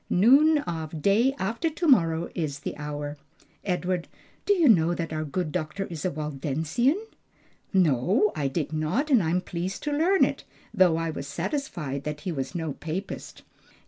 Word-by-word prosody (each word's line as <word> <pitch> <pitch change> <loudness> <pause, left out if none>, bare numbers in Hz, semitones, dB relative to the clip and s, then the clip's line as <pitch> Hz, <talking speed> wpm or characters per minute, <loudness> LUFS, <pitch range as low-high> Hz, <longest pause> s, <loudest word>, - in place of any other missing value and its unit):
"Noon 275 - +6
of 160 - -4
day 230 +7 +3
after 230 - -1
to 330 +2 -2
morrow 165 - +3
is 150 -4 -3
the - - -4
hour. 145 0 -5 0.5
Edward, 180 -2 -1 0.4
do 410 - +6
you 340 -5 +4
know 175 -6 +5
that 165 -2 -4
our 155 0 -2
good 155 +2 -3
doctor 170 +3 -3
is 160 -3 -5
a 185 - +1
Waldensian?" 155 - -1 0.7
"No, 185 - +3
I 145 -3 0
did 145 +2 -3
not, 155 - 0
and 250 -6 +6
am 175 +2 +1
pleased 180 +2 -4
to 295 - -1
learn 340 +7 +4
it; - - -4 0.3
though 180 -3 +4
I 165 0 -1
was 140 -2 -6
satisfied 170 - -3
that 150 0 -4
he 180 - -3
was 135 +2 -4
no 160 -4 -2
Papist." 165 +8 -6
170 Hz, 170 wpm, -26 LUFS, 155-215 Hz, 0.7 s, Noon